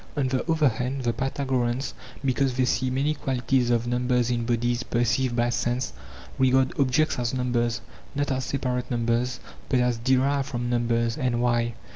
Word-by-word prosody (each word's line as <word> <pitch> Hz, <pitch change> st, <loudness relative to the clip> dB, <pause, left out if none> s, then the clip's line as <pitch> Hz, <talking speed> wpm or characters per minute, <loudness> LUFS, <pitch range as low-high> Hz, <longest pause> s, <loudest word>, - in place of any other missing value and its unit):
On 140 Hz, -2 st, +2 dB
the 130 Hz, -1 st, 0 dB
other 160 Hz, -2 st, +4 dB
hand 125 Hz, +3 st, -3 dB
the 120 Hz, -1 st, +1 dB
Pytha 135 Hz, +2 st, -2 dB
goreans, 125 Hz, 0 st, 0 dB, 0.3 s
because 130 Hz, 0 st, +1 dB
they 130 Hz, -, +3 dB
see 130 Hz, +1 st, +1 dB
many 135 Hz, +4 st, +1 dB
qualities 130 Hz, -3 st, 0 dB
of 120 Hz, -1 st, +2 dB
numbers 125 Hz, 0 st, +1 dB
in 120 Hz, -1 st, -1 dB
bodies 120 Hz, 0 st, 0 dB
perceived 120 Hz, +1 st, 0 dB
by 120 Hz, 0 st, +2 dB
sense, 120 Hz, +3 st, -1 dB, 0.5 s
regard 130 Hz, 0 st, +3 dB
objects 140 Hz, +2 st, +2 dB
as 120 Hz, +1 st, -1 dB
numbers, 120 Hz, -2 st, 0 dB, 0.3 s
not 145 Hz, 0 st, 0 dB
as 130 Hz, 0 st, -1 dB
separate 125 Hz, -2 st, -2 dB
numbers, 120 Hz, +1 st, 0 dB, 0.3 s
but 130 Hz, -, +3 dB
as 125 Hz, -2 st, +1 dB
derived 135 Hz, +3 st, +2 dB
from 120 Hz, -3 st, -3 dB
numbers. 115 Hz, 0 st, +1 dB
And 125 Hz, -3 st, 0 dB
why 120 Hz, -1 st, +1 dB
125 Hz, 170 wpm, -26 LUFS, 120-130 Hz, 0.5 s, other